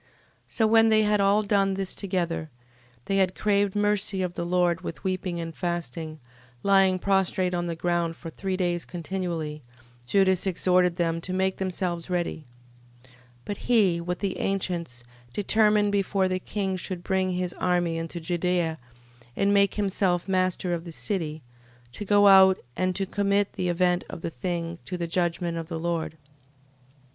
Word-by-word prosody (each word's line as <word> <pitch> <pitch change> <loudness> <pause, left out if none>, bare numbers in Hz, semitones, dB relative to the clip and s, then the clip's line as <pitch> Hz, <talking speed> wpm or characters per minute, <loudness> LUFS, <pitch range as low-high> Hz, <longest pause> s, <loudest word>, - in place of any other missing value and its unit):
13:12. - - -33 0.4
So 225 - +1
when 225 +1 +5
they 215 0 +4
had 210 -1 +2
all 200 +2 +3
done 195 -2 +2
this 195 -1 -2
together, 175 -5 -2 0.6
and 195 0 +1
had 185 -1 +2
craved 205 -1 +1
mercy 205 -2 +1
of 180 -1 -3
the 170 - -3
Lord 175 -1 +1
with 165 -4 -7
weeping 185 -2 -2
and 165 -1 -5
fasting, 165 -3 -4 0.4
lying 195 -2 +4
prostrate 190 -1 +1
on 175 0 -1
the 170 - -3
ground 170 -1 -1
for 165 0 -9
three 190 +1 -3
days 175 -2 0
continually, 170 -3 -4 0.5
Judas 190 +3 +3
exhorted 180 -1 +2
them 165 -1 -1
to 185 - -5
make 190 0 0
themselves 180 -2 -3
ready. 175 -3 -2 0.6
13:13. 130 - -23 0.3
But 205 - -4
he, 195 -8 +2
with 180 +1 -3
the 195 -2 -2
ancients, 170 -10 -2 0.3
determined 210 0 +3
before 195 -1 +1
the 185 0 -1
king 190 0 -2
should 185 -1 -6
bring 190 -1 0
his 180 0 -2
army 175 -2 +1
into 165 +1 -5
Judea, 175 -1 -1 0.6
and 200 0 +2
make 200 0 +3
himself 190 -3 0
master 185 -1 0
of 170 -1 -3
the 170 - -8
city, 160 -4 -3 0.5
to 130 - -7
go 205 0 +4
out, 190 -1 +7 0.2
and 185 0 0
to 195 - -1
commit 200 +1 0
the 180 - -2
event 180 0 +2
of - - -7
the 165 - -4
thing 170 +4 -4
to 180 - -4
the 170 - -2
judgment 170 0 -1
of 165 - -6
the 165 -1 -4
Lord. 165 -1 -2
13:14. - - -25
180 Hz, 170 wpm, -26 LUFS, 170-195 Hz, 0.6 s, out